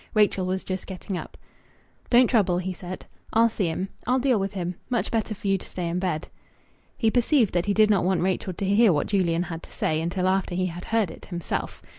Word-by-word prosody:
Rachel 200 Hz, -3 st, +3 dB
was 185 Hz, +1 st, -1 dB
just 185 Hz, -1 st, -4 dB
getting 190 Hz, +1 st, -5 dB
up. -, -, -7 dB, 0.7 s
"Don't 245 Hz, +1 st, +6 dB
trouble," 200 Hz, -7 st, +2 dB
he 185 Hz, +1 st, -2 dB
said. 180 Hz, +1 st, -8 dB, 0.3 s
"I'll 230 Hz, +1 st, +5 dB
see 195 Hz, -5 st, 0 dB
him. 185 Hz, +4 st, -2 dB, 0.2 s
I'll 250 Hz, +1 st, +3 dB
deal 255 Hz, -4 st, +2 dB
with 195 Hz, +1 st, -2 dB
him. 180 Hz, -2 st, -3 dB, 0.2 s
Much 245 Hz, -2 st, 0 dB
better 220 Hz, -2 st, -1 dB
for 200 Hz, -, -6 dB
you 195 Hz, -1 st, +2 dB
to -, -, -11 dB
stay 180 Hz, -2 st, -4 dB
in 175 Hz, +2 st, -1 dB
bed." 180 Hz, -4 st, -2 dB, 0.7 s
He 225 Hz, -2 st, +2 dB
perceived 245 Hz, -1 st, +3 dB
that 175 Hz, +2 st, 0 dB
he 200 Hz, -, +2 dB
did 215 Hz, -1 st, +5 dB
not 195 Hz, -4 st, +3 dB
want 185 Hz, 0 st, +1 dB
Rachel 185 Hz, 0 st, -1 dB
to 195 Hz, -, -3 dB
hear 200 Hz, +2 st, +5 dB
what 145 Hz, -3 st, +1 dB
Julian 175 Hz, -4 st, +1 dB
had 165 Hz, -1 st, -6 dB
to -, -, -14 dB
say 155 Hz, 0 st, 0 dB
until 180 Hz, +2 st, -1 dB
after 190 Hz, -1 st, +1 dB
he 185 Hz, +1 st, +1 dB
had 175 Hz, 0 st, -5 dB
heard 220 Hz, -6 st, +1 dB
it -, -, -12 dB
himself. 175 Hz, -3 st, -4 dB
190 Hz, 230 wpm, -25 LUFS, 175-215 Hz, 0.7 s, Don't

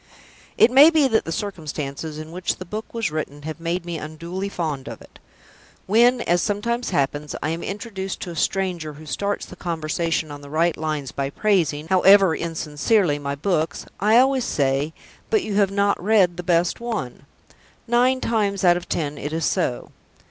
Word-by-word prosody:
It 240 Hz, -, +6 dB
may 280 Hz, +5 st, +9 dB
be 310 Hz, -4 st, +3 dB
that 225 Hz, -3 st, +1 dB
the 165 Hz, -, -4 dB
circumstances 155 Hz, -5 st, -5 dB
in 155 Hz, +1 st, -8 dB
which 180 Hz, +1 st, -2 dB
the 185 Hz, -, -9 dB
book 215 Hz, +5 st, -6 dB
was 230 Hz, -7 st, -2 dB
written 145 Hz, -2 st, -5 dB
have 155 Hz, +1 st, -6 dB
made 170 Hz, +1 st, -2 dB
me 170 Hz, -2 st, -4 dB
unduly 170 Hz, +6 st, -5 dB
fond 155 Hz, -8 st, -3 dB
of -, -, -7 dB
it. -, -, -17 dB, 0.7 s
When, 240 Hz, +4 st, +4 dB
as 175 Hz, -3 st, +1 dB
sometimes 235 Hz, +4 st, -1 dB
happens, 145 Hz, -2 st, -1 dB
I 155 Hz, -, 0 dB
am 165 Hz, +1 st, -3 dB
introduced 195 Hz, -2 st, -5 dB
to 175 Hz, -, -5 dB
a -, -, -8 dB
stranger 175 Hz, -3 st, -1 dB
who 155 Hz, +2 st, -12 dB
starts 200 Hz, +6 st, -2 dB
the -, -, -12 dB
conversation 165 Hz, -2 st, -2 dB
on 145 Hz, 0 st, -8 dB
the 145 Hz, -, -11 dB
right 165 Hz, +3 st, +1 dB
lines 155 Hz, -3 st, -3 dB
by 135 Hz, 0 st, -2 dB
praising, 160 Hz, -4 st, +1 dB
however 190 Hz, -1 st, +6 dB
insincerely, 165 Hz, +1 st, 0 dB
my 140 Hz, 0 st, -3 dB
books, 160 Hz, +1 st, -1 dB
I 215 Hz, +4 st, +4 dB
always 260 Hz, 0 st, +4 dB
say, 140 Hz, -1 st, 0 dB, 0.4 s
"But 435 Hz, -3 st, +2 dB
you 215 Hz, -, -4 dB
have 200 Hz, -2 st, +4 dB
not 200 Hz, -1 st, +1 dB
read 195 Hz, -4 st, +4 dB
the 180 Hz, -, -5 dB
best 170 Hz, 0 st, +1 dB
one." 210 Hz, -, -5 dB, 0.6 s
Nine 250 Hz, +2 st, +3 dB
times 205 Hz, -4 st, 0 dB
out 175 Hz, -1 st, +5 dB
of 175 Hz, -, -8 dB
ten 145 Hz, -2 st, -2 dB
it 145 Hz, -, -4 dB
is 160 Hz, -1 st, -1 dB
so. 165 Hz, -10 st, -1 dB
175 Hz, 185 wpm, -22 LUFS, 155-205 Hz, 0.7 s, may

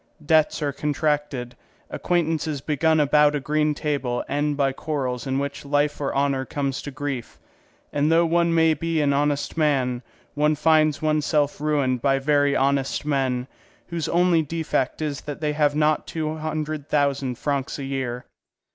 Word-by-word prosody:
Debts 155 Hz, 0 st, +3 dB
are 145 Hz, -1 st, -1 dB
contracted, 145 Hz, -4 st, -2 dB, 0.4 s
acquaintances 160 Hz, -4 st, -1 dB
begun 155 Hz, +3 st, +1 dB
about 150 Hz, 0 st, +4 dB
a -, -, 0 dB
green 150 Hz, +1 st, 0 dB
table 140 Hz, -5 st, -2 dB
end 145 Hz, 0 st, -1 dB
by 135 Hz, -2 st, +2 dB
quarrels 130 Hz, -3 st, -3 dB
in 130 Hz, 0 st, 0 dB
which 140 Hz, 0 st, -3 dB
life 145 Hz, +1 st, 0 dB
or 140 Hz, -, -1 dB
honour 140 Hz, -1 st, +1 dB
comes 140 Hz, 0 st, -3 dB
to -, -, -6 dB
grief; 140 Hz, -3 st, -5 dB, 0.6 s
and 145 Hz, +2 st, +2 dB
though 165 Hz, +1 st, +4 dB
one 170 Hz, 0 st, +2 dB
may 160 Hz, -1 st, +4 dB
be 165 Hz, +1 st, -1 dB
an 145 Hz, -2 st, +2 dB
honest 145 Hz, +2 st, 0 dB
man, 130 Hz, -6 st, +1 dB, 0.3 s
one 150 Hz, +1 st, +2 dB
finds 155 Hz, 0 st, +3 dB
oneself 150 Hz, -1 st, +1 dB
ruined 140 Hz, -5 st, +1 dB
by 135 Hz, 0 st, +2 dB
very 145 Hz, 0 st, +2 dB
honest 135 Hz, +1 st, 0 dB
men, 130 Hz, -4 st, 0 dB, 0.4 s
whose 170 Hz, -3 st, -3 dB
only 175 Hz, -1 st, +3 dB
defect 155 Hz, -2 st, -2 dB
is 145 Hz, -2 st, -3 dB
that 145 Hz, -1 st, -7 dB
they 150 Hz, -1 st, -1 dB
have 145 Hz, -1 st, +2 dB
not 155 Hz, 0 st, +1 dB
two 155 Hz, -1 st, -3 dB
hundred 155 Hz, -1 st, -4 dB
thousand 140 Hz, -4 st, 0 dB
francs 140 Hz, -1 st, -2 dB
a 140 Hz, -, -5 dB
year. 130 Hz, -3 st, -3 dB
145 Hz, 160 wpm, -23 LUFS, 140-155 Hz, 0.6 s, about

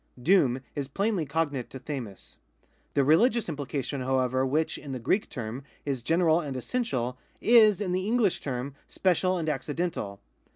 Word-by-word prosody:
^ -, -, -13 dB
Doom 135 Hz, -8 st, +4 dB
is 140 Hz, -2 st, -2 dB
plainly 195 Hz, +1 st, -1 dB
cognate 145 Hz, -4 st, -1 dB
to 130 Hz, -, -8 dB
(^f'^uc 125 Hz, -8 st, -7 dB, 0.6 s
The 140 Hz, -, +4 dB
religious 220 Hz, -, +4 dB
implication, 140 Hz, -3 st, -3 dB
however, 130 Hz, 0 st, +1 dB
which, 150 Hz, +4 st, 0 dB
in 140 Hz, -2 st, -7 dB
the 130 Hz, -, -4 dB
Greek 185 Hz, -, 0 dB
term, 120 Hz, +1 st, -5 dB, 0.2 s
is 135 Hz, -4 st, -2 dB
general 165 Hz, +4 st, +3 dB
and 140 Hz, -6 st, -4 dB
essential, 130 Hz, -, -2 dB, 0.2 s
is, 220 Hz, -4 st, +6 dB
in 195 Hz, -4 st, -2 dB
the 185 Hz, +3 st, -1 dB
iMiglish 225 Hz, -5 st, +2 dB
term, 135 Hz, 0 st, -4 dB
special 185 Hz, 0 st, +1 dB
and 165 Hz, -2 st, -3 dB
accidental. 145 Hz, -, -2 dB
145 Hz, 160 wpm, -28 LUFS, 130-185 Hz, 0.6 s, is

